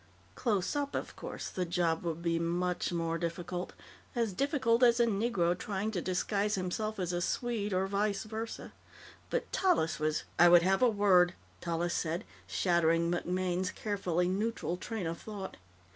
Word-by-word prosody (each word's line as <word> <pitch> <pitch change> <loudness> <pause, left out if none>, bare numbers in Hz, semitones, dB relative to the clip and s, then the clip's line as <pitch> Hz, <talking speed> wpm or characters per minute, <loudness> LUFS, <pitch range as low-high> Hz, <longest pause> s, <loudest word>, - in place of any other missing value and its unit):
Close 210 0 0
up, 285 -1 -1
of - - -4
course, - - -6
the 185 - -2
job 170 -2 0
would 170 -1 -4
be 165 -1 +1
much 175 +2 -1
more 165 -1 -1
difficult 175 +1 -4 0.4
as 230 -4 0
difficult 260 - +2
as 240 -1 +6
a 235 - +5
Negro 200 -5 +1
trying 200 +3 -3
to 185 -5 -2
disguise 200 +4 0
himself 215 +4 -2
as 180 -2 -2
a 175 - 0
Swede 220 +1 -1
or 190 +1 +1
_vice 200 +1 0
versa__. 220 +1 -5 0.6
But - - -2
Tallis 260 - +2
was 155 0 0 0.2
"I 175 - +8
would 175 -1 +7
have 190 +4 +2
a 250 - +6
word," 185 -4 +4 0.3
Tallis 170 0 -1
said, 170 +4 -1 0.2
shattering 170 -1 +2
MacMaine's 180 +1 -1
carefully 180 -4 -1
neutral 200 -1 -1
train 210 +1 -4
of 165 0 -4
thought. 200 -3 -7
185 Hz, 160 wpm, -32 LUFS, 175-215 Hz, 0.6 s, I